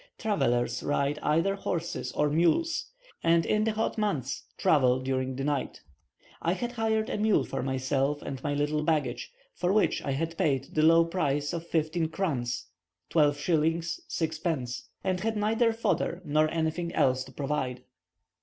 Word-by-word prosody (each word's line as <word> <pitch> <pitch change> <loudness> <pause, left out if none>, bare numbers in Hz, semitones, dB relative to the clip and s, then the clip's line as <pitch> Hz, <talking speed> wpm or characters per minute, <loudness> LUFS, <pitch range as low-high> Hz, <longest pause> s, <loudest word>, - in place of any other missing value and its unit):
Travellers 120 - 0
ride 145 +1 0
either 165 +6 +2
horses 170 -3 -3
or 150 - +2
mules, 175 - +1 0.3
and 165 0 +4
in 215 0 +2
the 220 - +1
hot 220 +1 -1
months 150 - -1
travel 130 -4 +4
during 130 0 -2
the 135 - -3
night. 145 -2 -2 0.6
I 170 - +1
had 240 +5 -3
hired 220 -2 0
a - - -3
mule 210 -9 +3
for 135 0 -4
myself 135 +2 0
and 135 -2 -5
my 145 - -1
little 150 +1 0
baggage, 155 - -1 0.2
for 180 0 0
which 210 +1 +2
I 135 -2 -1
paid 145 -5 -1
the 155 - +2
low 165 +1 +6
price 145 -4 -1
of 170 0 -4
fifteen 160 0 0
krans 130 -9 -2 0.5
(12s. 160 - +2
6d.), 160 -6 -2 0.2
and 185 -1 0
had 220 +3 -1
neither 225 +3 +2
fodder 205 -5 -1
nor 155 +1 +2
anything 165 +1 -1
else 130 -1 +3
to 130 - -13
provide. 130 -2 -3
155 Hz, 155 wpm, -28 LUFS, 135-180 Hz, 0.6 s, low